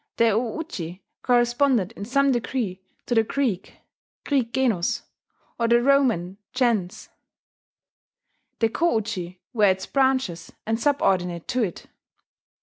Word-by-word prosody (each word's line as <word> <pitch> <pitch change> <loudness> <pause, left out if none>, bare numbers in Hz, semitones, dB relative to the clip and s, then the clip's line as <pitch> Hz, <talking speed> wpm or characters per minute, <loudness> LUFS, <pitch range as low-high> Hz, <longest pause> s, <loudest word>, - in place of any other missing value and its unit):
The 230 -1 +4
o 225 +4 -1
uji 190 - -6 0.2
corresponded 240 -3 +2
in 200 - -7
some 275 +4 +3
degree 235 -6 -2 0.2
to - - -1
the 225 - +5
Greek 220 -5 -2 0.5
(Greek 260 -5 +1
genos) 235 -9 0 0.6
or 230 - +2
the 235 +1 +5
Roman 240 -9 +2 0.2
gens: 220 -6 0 1.5
the 225 - +2
ko 335 +4 +1
uji 185 -5 -4
were 215 -3 +4
its 190 -1 +2
branches, 260 -10 0
and 225 +1 0
subordinate 180 - +1
to 255 0 +1
it. 190 -7 -3
230 Hz, 125 wpm, -24 LUFS, 190-260 Hz, 1.5 s, the